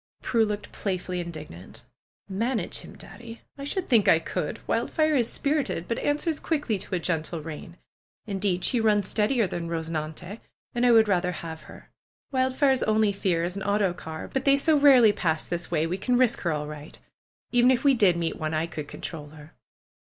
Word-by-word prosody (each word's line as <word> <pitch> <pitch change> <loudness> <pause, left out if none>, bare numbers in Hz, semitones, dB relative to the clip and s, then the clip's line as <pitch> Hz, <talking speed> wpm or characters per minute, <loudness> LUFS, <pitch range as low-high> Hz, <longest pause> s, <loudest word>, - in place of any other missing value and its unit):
Prue 230 -2 +2
looked 210 -1 -5
playfully 185 -2 -3
indignant. 155 - -9 0.4
^'Manage 225 +5 -2
him. - - -12
Daddy! 230 -1 -11
I 280 - -8
should 365 +5 -2
think 225 -5 +4
I - - +7
could! 165 - -3
Wild - - 0
fire 310 -1 +2
is 240 -4 +2
spirited; 285 - -1
but 230 - -2
answers 300 +2 -1
quickly 290 - -1
to 185 - -4
a - - 0
gentle 165 -1 -2
rein. 165 +2 -8 0.5
Indeed, 195 -3 -1
she 245 -3 +2
runs 210 -3 +2
steadier 225 +3 +1
than 170 -2 -4
Eosenante, 165 +4 -4 0.3
and 245 +1 +2
I - - +6
would 225 -2 +6
rather 180 -2 +1
have 160 -1 -7
her. - - -14 0.4
Wildfire's 260 0 +2
only 215 -1 +2
fear 180 -4 0
is 175 +2 -2
an 200 - -5
autocar. 190 -6 -1
But 265 - -2
they 275 0 +5
so 310 +2 +4
rarely 265 -7 +6
pass 165 -6 -1
this 175 0 -4
way, 160 -2 +1
we 180 +4 -3
can 245 +5 +1
risk 250 -2 +3
her 170 - 0
all 150 -1 -2
right. 150 0 -9 0.5
Even 245 0 +5
if 255 -2 +2
we 280 -1 +5
did 200 -8 +4
meet 165 -1 -2
one, 155 0 -2
I 155 +1 0
could 155 -3 -7
control 150 -2 -7
her." 150 0 -14
200 Hz, 190 wpm, -26 LUFS, 165-245 Hz, 0.5 s, I